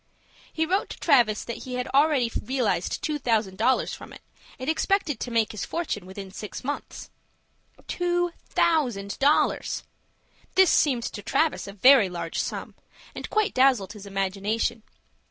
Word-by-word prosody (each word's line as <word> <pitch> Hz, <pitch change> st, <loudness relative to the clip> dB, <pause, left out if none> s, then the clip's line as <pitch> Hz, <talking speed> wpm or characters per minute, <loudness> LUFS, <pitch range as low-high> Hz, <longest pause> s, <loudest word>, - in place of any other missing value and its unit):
He 320 Hz, -, 0 dB
wrote 380 Hz, +5 st, 0 dB
to -, -, -8 dB
Travis 240 Hz, -9 st, +3 dB
that 235 Hz, -, -5 dB
he 255 Hz, -1 st, -5 dB
had 250 Hz, 0 st, -2 dB
already 275 Hz, -4 st, +3 dB
realized 245 Hz, -9 st, -1 dB
two 300 Hz, -1 st, -1 dB
thousand 215 Hz, -7 st, 0 dB
dollars 255 Hz, +4 st, +2 dB
from -, -, -10 dB
it, -, -, -12 dB, 0.4 s
and 255 Hz, -, -7 dB
expected 320 Hz, -, +1 dB
to -, -, -4 dB
make 230 Hz, -2 st, +1 dB
his 215 Hz, -, -5 dB
fortune 255 Hz, -, -3 dB
within 190 Hz, 0 st, -8 dB
six 210 Hz, +1 st, -7 dB
months. 290 Hz, +3 st, -5 dB, 0.8 s
Two 350 Hz, 0 st, 0 dB, 0.2 s
thousand 245 Hz, -12 st, +1 dB
dollars! 285 Hz, +2 st, +2 dB, 0.7 s
This 380 Hz, -2 st, +6 dB
seemed 255 Hz, -6 st, +3 dB
to 205 Hz, -, -5 dB
Travis 280 Hz, +7 st, 0 dB
a 200 Hz, -, -7 dB
very 235 Hz, 0 st, +6 dB
large 170 Hz, -2 st, -4 dB
sum, -, -, -4 dB, 0.4 s
and -, -, -7 dB
quite 430 Hz, -1 st, +1 dB
dazzled 255 Hz, -7 st, +3 dB
his 205 Hz, -2 st, -11 dB
imagination. 200 Hz, +4 st, -1 dB
245 Hz, 155 wpm, -26 LUFS, 205-300 Hz, 0.8 s, This